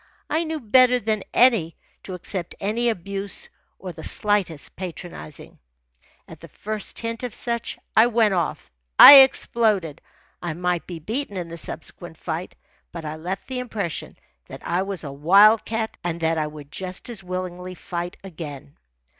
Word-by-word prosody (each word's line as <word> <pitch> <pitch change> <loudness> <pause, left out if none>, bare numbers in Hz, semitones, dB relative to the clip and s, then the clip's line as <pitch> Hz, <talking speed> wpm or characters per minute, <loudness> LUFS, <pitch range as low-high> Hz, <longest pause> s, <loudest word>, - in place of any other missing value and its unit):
I 325 +2 +1
knew 315 0 -3
better 250 +1 +5
than 220 -3 -1
to 200 -5 +1
accept 180 0 -5
any 230 +4 0
abuse 200 -1 -3 0.3
or 185 - -7
the 160 -1 -11
slightest 200 -8 0
patronizing. 175 -4 -9 0.7
At - - -12
the - - -12
first 215 -1 -4
hint 230 0 -4
of 250 -3 -5
such, 235 -2 -3 0.2
I 225 +2 +7
went 225 -3 +2
off 170 - -2 0.3
I 285 - +13
exploded. 220 - +3 0.4
I 170 -3 -4
might 180 0 -2
be 175 - -6
beaten 215 - -4
in 175 -2 -5
the 170 - -8
subsequent 165 +1 -6
fight, 165 +2 -5 0.4
but 170 -2 -7
I 150 0 -4
left 175 +5 -5
the 260 -1 -4
impression 215 -9 -4 0.3
that - - -11
I 175 +2 0
was 195 -3 -3
a 140 - -6
wild 200 +10 +5
cat 225 0 -3
and 170 -1 -3
that 160 0 +1
I 155 - -1
would 150 -1 -11
just 185 -1 -6
as 230 -5 -6
willingly 185 0 -5
fight 175 -1 -5
again. 150 -6 -9
185 Hz, 160 wpm, -23 LUFS, 170-220 Hz, 0.7 s, I